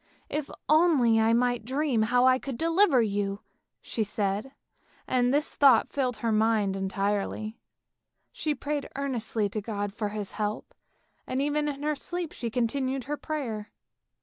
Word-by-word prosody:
" - - -38
If 280 - -16 0.2
only 300 -8 +4
I 220 +1 +4
might 245 0 +2
dream 260 -1 0
how 245 +3 +3
I 260 0 +5
could 270 -3 -5
deliver 330 - +4
you," 200 -1 -2 0.4
she 225 - -2
said, 205 +4 -2 0.6
and 250 -1 +2
this 295 +3 +2
thought 270 -6 +5
filled 255 -4 0
her 225 - +2
mind 215 -2 +2
entirely. 200 +3 -2 0.7
She 305 -1 -2
prayed 290 0 -3
earnestly 235 -6 -1
to 215 +2 -3
God 205 -1 -3
for 210 -1 -2
His 205 -2 -4
help, 210 +1 -3 0.5
and 255 - -1
even 295 +1 0
in 285 -1 -4
her 300 0 +1
sleep 345 +2 -4
she 235 - -4
continued 260 +3 -1
her 295 +4 -3
prayer. 245 -9 -4
245 Hz, 155 wpm, -28 LUFS, 215-280 Hz, 0.7 s, I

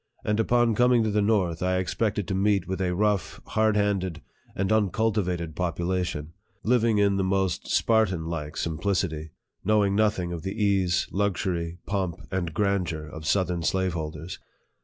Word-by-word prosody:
And 105 +1 +1
upon 120 +1 +3
com 125 +3 +4
ing 120 -2 +4
to 110 - 0
the 105 0 +2
north, 95 -6 +1
I 90 0 +1
expected 100 +1 -1
to - - -2
meet 100 -1 +2
with 95 0 -3
a 90 -1 0
rough, 100 -4 0
hard 110 -1 +2
handed, 95 -5 0 0.3
and 95 +1 -1
uncultivated 100 -6 0
population, 85 -3 -2 0.3
living 115 -2 +3
in 100 -1 +3
the 95 - +1
most 95 -2 0
Spartan 105 -7 +2
like 75 -3 -4
simplicity, 80 -1 -1 0.3
knowing 105 -1 +3
nothing 105 -5 +1
of 85 - -5
the 95 +4 -4
ease, 95 -4 +2
luxury, 90 -4 -1
pomp, 95 -4 -1 0.2
and 90 -3 -1
grandeur 90 -4 -1
of 80 +1 -8
southern 90 0 +1
slave 95 +2 0
holders. 80 +1 -5
95 Hz, 160 wpm, -26 LUFS, 85-105 Hz, 0.3 s, com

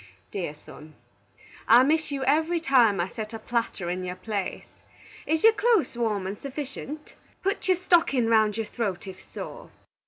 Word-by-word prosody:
Dear 170 -7 -4
son: 155 +1 -14 0.7
I 240 +2 +8
miss 315 +3 +1
you 275 -2 -3
every 320 +5 +2
time 245 - +4
I 175 - +1
set 220 +1 -6
a - - -3
platter 225 -5 -2
in 180 +1 -2
your 180 0 -4
place. 200 +1 -5 0.5
Is 320 0 +1
your 450 0 +8
close 435 - +2
warm 215 -5 -1
and 195 +2 -5
suffitient? 285 +2 -7 0.3
Put 390 +1 -1
your 370 -1 +4
stockin 330 -9 +3
round 220 -2 +3
your 225 - -1
throat 205 -6 -3
if 190 -1 -9
sore. - - -9
235 Hz, 165 wpm, -26 LUFS, 200-310 Hz, 0.7 s, I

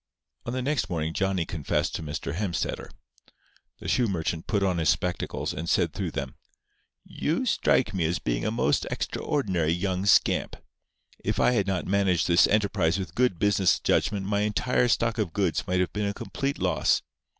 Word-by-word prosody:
On 120 - -2
the 130 0 -2
next 145 +2 0
morning 80 -2 -2
Johnny 95 -3 0
confessed 80 -5 -1
to - - -3
Mr. 75 -2 -4
Hemstetter. 90 -2 -3 0.9
The - - -9
shoe 125 -2 +2
merchant 85 -3 -2
put 100 -3 +1
on 90 -3 +1
his 80 - +2
spectacles, 90 -1 -1
and 85 +2 -4
said - - +2
through - - -3
them: - - -5 0.7
"You 165 - -2
strike 125 - +2
me 90 -4 0
as 85 +2 0
being - - -2
a - - 0
most - - +1
extraordinary 90 - -1
young 95 +2 -1
scamp. 95 - +3 0.7
If - - -1
I - - +4
had 100 -5 +1
not 95 -2 -1
managed 95 -3 +2
this 85 0 +5
enterprise 100 -5 +1
with 95 -2 -5
good 125 -8 +1
business 100 -1 +3
judgment 100 -2 +1
my 100 +1 0
entire 105 +4 +1
stock 115 -1 +1
of 100 -7 -1
goods 95 -5 0
might 90 0 +1
have 90 - -2
been 105 0 -1
a 100 - -3
complete 140 +1 -3
loss. - - +1
95 Hz, 180 wpm, -26 LUFS, 85-105 Hz, 0.9 s, this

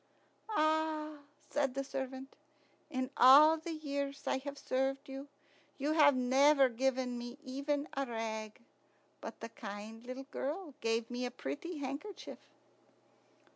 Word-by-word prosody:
"Ah!" 310 -4 +1 0.3
said 275 -3 +1
the 275 - -1
servant, 265 0 -5 0.5
"in 260 -2 -2
all 295 +6 +9
the 320 +2 -6
years 280 -2 -3
I've 280 +2 -2
served 270 +1 -1
you, 270 +1 -7 0.5
you 290 +2 0
have 295 -3 +6
never 270 +2 +5
given 250 0 0
me 240 +2 -7
even 280 +2 -2
a 275 0 -1
rag; 220 -1 -4 0.6
but - - -8
the 230 - -5
kind 215 +1 -8
little 255 +2 -6
girl 305 +3 -3
gave 225 +1 0
me 245 +1 -2
a 250 - -1
pretty 255 - -5
handkerchief." 285 +9 -6
270 Hz, 130 wpm, -34 LUFS, 250-290 Hz, 0.6 s, all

